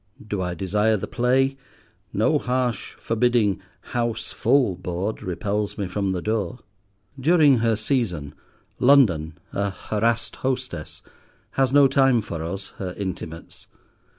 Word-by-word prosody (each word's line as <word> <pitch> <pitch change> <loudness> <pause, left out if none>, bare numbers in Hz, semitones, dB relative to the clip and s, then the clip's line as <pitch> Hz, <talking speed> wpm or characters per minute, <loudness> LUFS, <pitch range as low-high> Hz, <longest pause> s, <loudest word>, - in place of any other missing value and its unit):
Do 100 -3 -2
I 90 -1 -2
desire 105 +4 +1
the - - -4
play, 135 +2 +1 0.5
no - - +2
harsh, 125 -3 -1
forbidding 115 -4 +1 0.3
"House 120 -2 -1
full" 130 -9 +2
board 90 +4 -3
repels 100 +3 -2
me 100 - -1
from 95 +1 -1
the 90 -2 -3
door. 110 +1 -1 0.6
During 150 -3 +5
her 115 -1 +2
season, 105 - -1 0.5
London, 95 - +4 0.2
a 100 0 0
harassed 110 +3 -1
hostess, 125 -11 -3 0.5
has 135 -2 +1
no 140 0 +7
time 135 -3 +4
for 85 -4 -5
us, 95 +4 -5
her 90 -2 -4
intimates. 90 -4 -6
110 Hz, 125 wpm, -24 LUFS, 95-125 Hz, 0.6 s, no